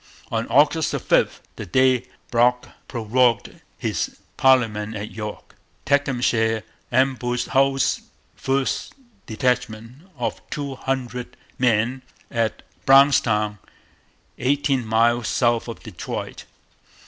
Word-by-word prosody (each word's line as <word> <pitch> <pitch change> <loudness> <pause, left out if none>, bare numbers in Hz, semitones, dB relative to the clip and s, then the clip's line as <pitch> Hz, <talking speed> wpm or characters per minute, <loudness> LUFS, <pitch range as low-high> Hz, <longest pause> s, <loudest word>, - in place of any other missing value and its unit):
On - - -1
August - - +3
5, - - +1 0.2
the 110 - -5
day 130 +4 +3 0.2
Brock 125 +1 +2 0.2
prorogued 120 -1 +1 0.2
his - - -2 0.2
parliament 110 -5 +2
at 105 0 -5
York, 105 -1 -7 0.3
Tecumseh 120 -5 +1 0.3
ambushed 125 -1 +1
Hull's 135 0 +2 0.3
first 135 0 -1 0.3
detachment 125 - -2
of 120 - -3
two 140 -2 -4
hundred 125 -1 -4 0.2
men 120 +1 +2 0.3
at 115 -2 -1 0.2
Brownstown, 115 -7 +4 0.8
eighteen 135 -2 +1
miles 115 +1 +2
south 120 -2 +1
of 115 - -8
Detroit. 100 -7 -6
125 Hz, 95 wpm, -22 LUFS, 110-130 Hz, 0.8 s, Brownstown